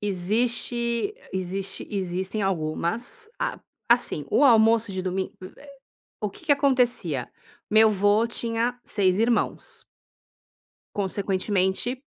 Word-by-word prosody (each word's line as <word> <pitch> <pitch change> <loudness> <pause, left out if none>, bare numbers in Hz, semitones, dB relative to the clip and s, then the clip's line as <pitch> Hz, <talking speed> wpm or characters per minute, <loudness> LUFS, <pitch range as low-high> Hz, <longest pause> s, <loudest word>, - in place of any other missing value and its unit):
existe 235 - -1 0.2
existe 190 +1 -3
existem 190 +1 -2
algumas. 195 - -2
A - - -2 0.3
assim, 235 - +2
o 290 - +4
almoço 225 -3 +5
de 185 - -3
domingo, 185 +1 -2 0.2
eh 290 - -15 0.5
o 210 -2 -2
que 330 - -15
que 295 - +6
acontecia: 245 - +1 0.4
Meu 220 +1 +6
avô 205 +2 +3
tinha 235 +1 -2
6 190 -2 +1
irmãos 230 +2 0 1.1
consequentemente, 195 +4 -1
210 Hz, 105 wpm, -25 LUFS, 190-235 Hz, 1.1 s, que